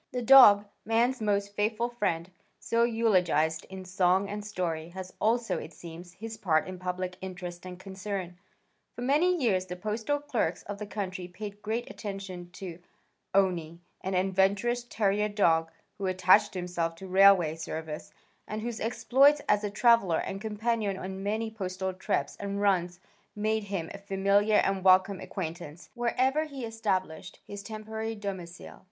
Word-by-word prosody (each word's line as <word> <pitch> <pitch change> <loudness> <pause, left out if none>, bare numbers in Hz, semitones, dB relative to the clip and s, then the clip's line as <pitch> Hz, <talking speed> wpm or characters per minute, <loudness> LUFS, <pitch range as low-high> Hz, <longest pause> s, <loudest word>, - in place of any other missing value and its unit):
The 250 -1 -3
dog, 220 -5 +9 0.2
man's 235 +3 +1
most 200 -1 0
faithful 215 +3 0
friend, 185 -7 -2 0.3
so 230 0 +1
eulogized 180 -9 +2
in 190 0 -8
song 185 +1 +2
and 205 +1 -5
story, 170 -6 -3
has 185 +1 -8
also, 230 +2 +1
it - - -9
seems, 170 +1 -10
his 220 +3 -8
part 165 -6 +1
in 185 -1 -7
public 180 0 -4
interest 180 -1 -7
and 180 0 -9
concern. 190 -2 -6 0.6
For 245 - -5
many 305 +8 +3
years 190 -8 +1
the 180 - -5
postal 215 +8 -2
clerks 230 - -2
of 200 0 -7
the 210 - -5
country 190 -3 -4
paid 205 +3 -8
great 225 +3 -2
attention 195 -4 -7
to 175 -2 -8 0.6
"Owney" 175 -4 +1 0.3
an 190 0 -2
adventurous 195 +6 +1
terrier 210 -2 +1
dog 165 -6 +2 0.3
who 195 - -1
attached 185 +1 +4
himself 175 -2 -2
to 190 - -10
the 185 - -10
Railway 190 -4 +6
Service 160 -1 -6 0.4
and 215 +1 -4
whose 235 -2 -4
exploits 245 +6 +4
as 210 0 +3
a 205 - -1
traveler 205 -5 +4
and 195 0 -4
companion 220 -2 -1
on 190 +1 -6
many 220 +3 -2
postal 190 -3 -4
trips 145 -6 -2
and 200 0 -4
runs 180 -3 +1 0.4
made 215 0 0
him 190 -5 -3
a 200 - -8
familiar 200 +2 +2
and 195 -1 -1
welcome 190 +1 +5
acquaintance 170 -2 -7
wherever 260 +5 +1
he 275 -5 -6
established 190 -6 -3
his 205 0 -7
temporary 220 +1 -5
domicile. 190 -4 -7
195 Hz, 155 wpm, -29 LUFS, 180-220 Hz, 0.6 s, dog